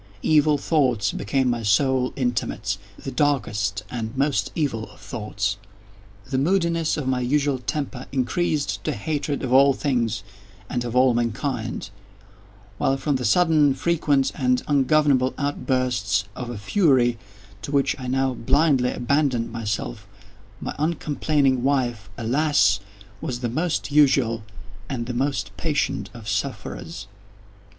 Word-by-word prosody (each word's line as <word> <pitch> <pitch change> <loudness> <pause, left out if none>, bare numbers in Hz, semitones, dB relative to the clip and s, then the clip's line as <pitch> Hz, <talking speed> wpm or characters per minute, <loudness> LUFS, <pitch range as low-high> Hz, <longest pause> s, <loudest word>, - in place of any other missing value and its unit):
Evil 150 -1 +4
thoughts 130 -9 +1
became 130 +6 0
my 120 -1 0
sole 125 +4 +2
intimates—the 105 -3 -3
darkest 115 -8 0
and 115 0 -4
most 140 +1 +1
evil 130 -9 -1
of - - -17
thoughts. 105 -3 -3 0.7
The 130 0 0
moodiness 170 0 +1
of 145 -4 -3
my 130 -1 +1
usual 140 +2 +1
temper 135 -1 -4
increased 135 - -1
to - - 0
hatred 145 +5 -2
of 125 -1 -1
all 135 +1 +6
things 115 -7 -1 0.4
and 120 - -2
of 120 0 -4
all 130 0 +5
mankind; 120 -2 -2 0.9
while, 135 - +2
from 145 0 0
the 125 - -5
sudden, 155 - +4
frequent, 145 -2 +1
and 125 -2 +1
ungovernable 140 -2 +3
outbursts 130 -7 0
of 125 -2 -5
a 120 - -5
fury 120 - +2 0.4
to - - -6
which 140 -2 +2
I 130 - -5
now 130 +1 +1
blindly 135 0 +2
abandoned 125 -2 0
myself, 105 -1 -4 0.5
my - - -4
uncomplaining 150 -4 +1
wife, 120 -6 0
alas, 135 -2 +2 0.4
was 120 -2 -4
the 120 - -1
most 160 +4 -1
usual 130 -6 +4 0.5
and 120 -4 -3
the 125 - -4
most 135 +3 -1
patient 145 -10 -1
of 115 -3 -11
sufferers. 125 - -4
130 Hz, 130 wpm, -23 LUFS, 120-145 Hz, 0.9 s, all